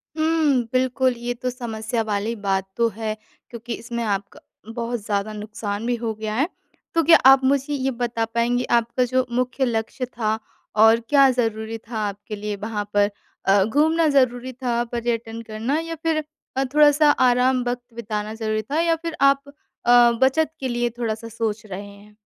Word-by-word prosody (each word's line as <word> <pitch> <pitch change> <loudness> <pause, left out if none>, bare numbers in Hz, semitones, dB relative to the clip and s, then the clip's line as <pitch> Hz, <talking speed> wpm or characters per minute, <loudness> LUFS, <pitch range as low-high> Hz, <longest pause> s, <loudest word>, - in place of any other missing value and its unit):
हुँ, 315 -5 +2
बिल्कुल, 255 0 +2
ये 240 +1 -3
तो 250 +1 -3
समस्या 230 -2 -3
वाली 215 +2 -2
बात 195 -2 -1
तो 235 0 +3
है 220 -1 -3 0.3
क्योंकि 235 0 -6
इसमें 235 0 -4
आपका 200 -2 -3 0.3
बहुत 235 0 -3
ज़्यादा 205 +1 -1
नुकसान 210 0 -5
भी 245 - +1
हो 230 -1 -3
गया 215 0 -4
है। 280 +7 +2 0.5
तो 330 -1 +3
क्या 330 +2 +8
आप 270 0 +8
मुझे 275 +2 +1
ये 270 -1 0
बता 235 -2 -2
पाएँगे 235 +2 0 0.2
आपका 235 +2 -1
जो 255 +1 +1
मुख्य 250 +2 0
लक्ष्य 235 +2 -2
था 220 -3 -2 0.4
और 225 +2 +6
क्या 275 -2 +6
ज़रूरी 225 -2 -2
था 225 0 -8
आपके 205 +2 -7
लिए 210 0 -4
वहाँ 210 +1 -3
पर? 205 0 +3 0.4
अ, 195 0 +5
घूमना 315 +7 +2
ज़रूरी 255 0 +1
था 240 -1 -1
पर्यटन 230 -1 -3
करना 225 +6 -2
या 330 0 -5
फिर 315 -2 +1 0.3
अ, 270 - +3
थोड़ा-सा 300 0 +6
आराम 255 -1 +3
वक़्त 245 -1 -4
बिताना 215 -2 -4
ज़रूरी 215 -1 -1
था? 290 +9 -2
या 335 0 +3
फिर 330 0 -5
आप 275 0 +5 0.4
अ, 240 0 +7
बचत 295 +4 +3
के 265 - -2
लिए 240 0 0
थोड़ा-सा 225 -1 -3
सोच 220 -1 -3
रहे 200 0 -7
हैं? 205 +1 -17
235 Hz, 175 wpm, -23 LUFS, 220-260 Hz, 0.5 s, क्या